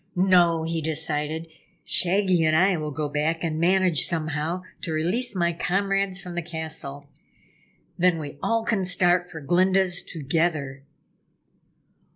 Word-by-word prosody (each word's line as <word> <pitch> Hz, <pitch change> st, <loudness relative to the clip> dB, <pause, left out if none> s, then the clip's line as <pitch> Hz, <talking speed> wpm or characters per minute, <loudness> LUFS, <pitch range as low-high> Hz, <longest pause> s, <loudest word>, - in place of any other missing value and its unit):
"No!" 175 Hz, -3 st, +4 dB
he 165 Hz, 0 st, -2 dB
decided 155 Hz, 0 st, -3 dB, 0.4 s
"Shaggy 185 Hz, -1 st, +3 dB
and 155 Hz, 0 st, +3 dB
I 185 Hz, +3 st, +4 dB
will 155 Hz, -2 st, -3 dB
go 150 Hz, +1 st, -3 dB
back 155 Hz, +3 st, -1 dB
and 160 Hz, -2 st, -2 dB
manage, 180 Hz, -2 st, +3 dB
somehow, 160 Hz, +2 st, -2 dB, 0.2 s
to 165 Hz, -, -3 dB
release 185 Hz, +10 st, 0 dB
my 170 Hz, -1 st, +1 dB
comrades 195 Hz, +2 st, -1 dB
from 180 Hz, -2 st, -8 dB
the 175 Hz, -, -2 dB
castle. 160 Hz, -4 st, -5 dB, 0.9 s
Then, 180 Hz, -1 st, +3 dB
we 145 Hz, -2 st, -7 dB
all 230 Hz, -1 st, 0 dB
can 220 Hz, -5 st, 0 dB
start 180 Hz, -1 st, +2 dB
for 160 Hz, -2 st, -9 dB
Glinda's 185 Hz, +3 st, +2 dB
together." 150 Hz, -3 st, -2 dB
170 Hz, 135 wpm, -24 LUFS, 155-185 Hz, 0.9 s, No